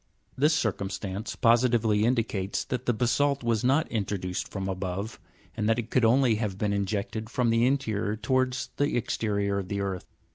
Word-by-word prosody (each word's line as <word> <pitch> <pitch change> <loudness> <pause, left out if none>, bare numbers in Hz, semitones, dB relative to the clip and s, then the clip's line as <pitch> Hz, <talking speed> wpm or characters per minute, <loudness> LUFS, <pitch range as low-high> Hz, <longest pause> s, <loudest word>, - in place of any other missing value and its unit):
This 150 +4 +3
circumstance 100 -3 -3
positively 115 -3 +3
indicates 110 -5 0
that 125 - -4
the - - +5
basa'lt 130 +4 +1
was 115 -2 +1
not 140 +6 +3
in 110 -3 0
troduced 90 -2 -3
from 95 -1 -4
above, 95 +3 -4 0.4
and 110 -1 0
that 115 - +3
it 120 -1 -4
could 125 -3 +3
only 120 -1 +4
have 105 -4 -2
been 105 0 0
injected 100 +2 -2
from 120 -1 +1
the 115 +2 +3
interior 110 -6 0
towards 130 +2 0
the 145 -2 +1
exterior 100 -3 -1
of 95 - -5
the 100 +1 -3
earth. 95 -2 -3
110 Hz, 175 wpm, -27 LUFS, 100-125 Hz, 0.4 s, the